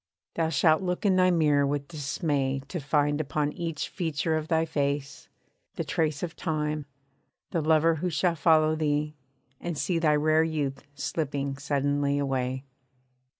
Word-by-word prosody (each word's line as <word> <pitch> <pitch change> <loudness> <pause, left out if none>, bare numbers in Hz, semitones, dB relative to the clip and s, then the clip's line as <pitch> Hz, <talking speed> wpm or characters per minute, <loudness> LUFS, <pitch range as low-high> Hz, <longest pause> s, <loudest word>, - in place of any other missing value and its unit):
Thou 165 -1 0
shalt 160 +2 +3
look 180 +2 -2
in 195 -2 +4
thy 185 0 +5
mirror 150 -5 +3
with 140 0 -2
dismay 145 -3 -1
To 175 - -3
find 145 +1 +1
upon 150 0 -1
each 165 -3 -3
feature 160 -2 -1
of 155 0 -2
thy 160 -1 +2
face, 140 -2 -2 0.5
the - - -2
trace 155 -2 -1
Of 170 -2 -4
time, 150 -3 -2 0.6
the 170 - 0
lover 160 +1 +3
who 180 +4 -1
shall 170 +2 +1
follow 155 0 +4
thee, 150 -1 0 0.5
and 170 -3 -4
see 170 +3 0
Thy 155 -2 +3
rare 155 +1 +3
youth 150 -4 -3
slipping 140 -1 -2
suddenly 145 0 0
away. 130 -1 -1
150 Hz, 150 wpm, -27 LUFS, 145-160 Hz, 0.6 s, thy